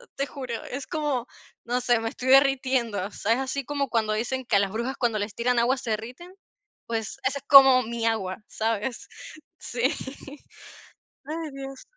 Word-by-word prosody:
te 275 - -1
juro. 255 -5 -6
Es 270 +1 -6
como, 295 -7 -2 0.4
no 245 +1 0
sé, 240 -1 +3
me 225 - -3
estoy 255 +2 -5
derritiendo. 260 -7 +3
O - - -15
sea, 225 +3 0
¿es 250 - -1
así 270 0 -3
como 285 -1 -2
cuando 220 -2 +1
dicen 245 +4 -2
que 220 - +1
a - - +6
las 195 -1 0
brujas 235 +5 -3
cuando 230 -4 0
les 205 +1 -4
tiran 240 0 +1
agua 250 +3 +3
se 250 -2 -6
derriten? 250 - -6 0.5
Pues, 225 +1 -3
esa 275 +2 0
es 275 - -25
como 270 -2 +9
mi 230 0 -4
agua, 195 -5 -1
¿sabes? 225 +2 -3 0.5
Sí. 240 0 -5 1.4
Ay, 315 0 -5
dios. 270 -1 -8
245 Hz, 180 wpm, -26 LUFS, 225-270 Hz, 1.4 s, como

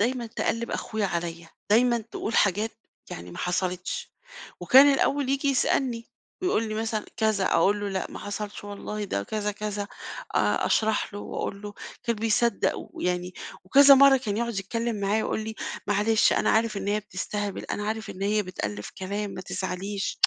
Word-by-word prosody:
دايمًا 240 +2 0
تقلِّب 230 0 -2
أخويا 215 -2 -2
عليَّ، 170 -1 -3 0.2
دايمًا 240 +2 +5
تقول 220 0 -5
حاجات 210 +3 +2 0.4
يعني 85 +1 -7
ما - - -9
حصلِتش، 180 0 -2 0.5
وكان 275 +2 +8
الأول 275 0 +1
ييجي 275 +1 +1
يسألني 250 -3 +1 0.3
ويقول 230 - +1
لي 215 - -3
مثلًا 220 -1 -2
كذا، 215 -3 +2
أقول 205 +1 +3
له: 205 - -2
"لأ، 190 -1 -3
ما - - -7
حصلتش 205 0 -5
والله 205 +1 -5
ده 100 - -2
كذا، 210 - -2
كذا." 210 0 -3 0.5
آآ، - - +2
أشرَح 220 -1 +1
له - - -4
واقول 200 +1 -4
له 205 0 -7 0.3
كان 235 -2 0
بيصدَّق 225 0 +2
ويعني 180 0 -3 0.3
وكذا 275 +8 +8
مرّة 275 0 +7
كان 215 -6 -2
يقعُد 235 -2 -1
يتكلّم 230 +2 -2
معايا 205 +2 +1
ويقول - - -1
لي: 220 0 -5 0.3
"معلش، 210 +2 +3
أنا - - +2
عارف 220 -1 +2
إن 200 0 -3
هي 210 +1 +1
بتستهبل، 205 0 -4
أنا 205 - -3
عارف 220 +1 -3
إن 185 - -7
هي 210 +1 +2
بتألِّف 105 - -5
كلام 200 +2 -3
ما - - -6
تزعليش." 195 +1 -3
210 Hz, 170 wpm, -26 LUFS, 195-230 Hz, 0.5 s, وكان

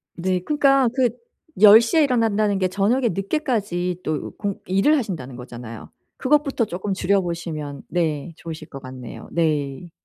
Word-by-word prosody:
네. 185 +1 0
그니까 275 +4 +3
그 255 -3 +3 0.5
10 215 +1 +10
시에 300 +8 +3
일어난다는 220 -6 +2
게 185 -1 +1
저녁에 220 +7 +1
늦게까지 195 - -1
또 155 -1 -3
공 200 -2 -3
일을 195 +12 +3
하신다는 165 - -4
거잖아요. 120 -2 -9 0.3
그것부터 275 -3 +2
조금 195 +1 -3
줄여 195 +2 +2
보시면 160 -5 -5
네 165 -2 -1
좋으실 160 -2 -8
것 135 - -9
같네요. 130 -3 -9
네. 155 -1 -1
185 Hz, 310 characters per minute, -22 LUFS, 155-230 Hz, 0.5 s, 10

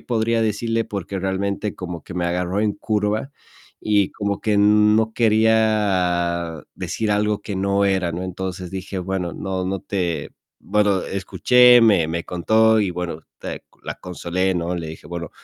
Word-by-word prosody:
podría 115 -1 0
decirle, 115 +1 0
porque 95 -1 -5
realmente 100 +2 -2
como 90 -4 -7
que 90 - -9
me 90 -1 -1
agarró 90 +3 -1
en 105 -1 +1
curva, 105 +5 -1 0.5
y 105 -2 +1
como 100 -1 -2
que 105 -2 +1
no 105 +1 +4
quería 100 -7 +2
decir 110 -2 -3
algo 105 0 +1
que 100 -2 -5
no 100 +1 +1
era, 95 -3 +1
¿no? 90 - -4
Entonces 95 -1 -5
dije: 95 +1 -5
"Bueno, 90 -1 -3
no 95 -1 -3
no 95 +1 -2
te". 85 -7 -2 0.3
Bueno, 100 -2 +2
escuché, 125 +6 +5
me 100 -8 +4
me 85 +1 -2
contó, 110 +5 +3
y 100 -3 0
bueno, 85 -2 -5 0.2
te - - -7 0.2
la - - -4
consolé, 90 +1 -2
¿no? 85 +1 -2
Le 85 -2 -4
dije: 80 -1 -10
"Bueno" 85 -2 -5
95 Hz, 160 wpm, -21 LUFS, 90-105 Hz, 0.5 s, escuché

